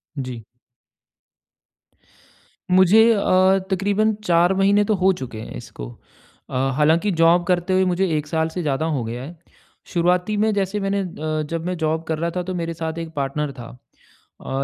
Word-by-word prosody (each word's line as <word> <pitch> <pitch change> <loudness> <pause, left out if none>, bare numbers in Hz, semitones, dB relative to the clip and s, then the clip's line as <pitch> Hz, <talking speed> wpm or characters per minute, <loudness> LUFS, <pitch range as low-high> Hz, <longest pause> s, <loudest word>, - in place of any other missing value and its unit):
जी। 125 -4 -6 2.3
मुझे 190 +4 +6
अ, 190 -2 +3
तकरीबन 205 +3 +1
4 175 0 +3
महीने 200 +2 +3
तो 215 - +1
हो 190 +1 +3
चुके 115 -4 -7
हैं - - -8
इसको, - - -9 0.6
अ, - - -6 0.2
हालाँकि 165 +7 +3
जॉब 170 +1 +5
करते 180 0 +1
हुए 185 0 +3
मुझे 185 +1 +1
1 150 0 -4
साल 160 +1 0
से 180 +2 -4
ज़्यादा 150 0 -1
हो 125 - -2
गया 120 +3 -5
है। 165 +4 -10 0.6
शुरुआती 180 +4 +1
में 215 0 +2
जैसे 200 +1 -1
मैंने 195 0 -1
अ, 155 -4 -3
जब 165 0 -4
मैं 180 - -2
जॉब 160 0 -1
कर 160 -1 -1
रहा 170 +1 -1
था 180 - -1
तो 185 - -5
मेरे 165 -1 -3
साथ 160 0 -5
एक 165 -1 -7
पार्टनर 140 +1 -2
था। 120 - -8 0.7
अ, 135 +1 -3
175 Hz, 170 wpm, -21 LUFS, 155-190 Hz, 2.3 s, मुझे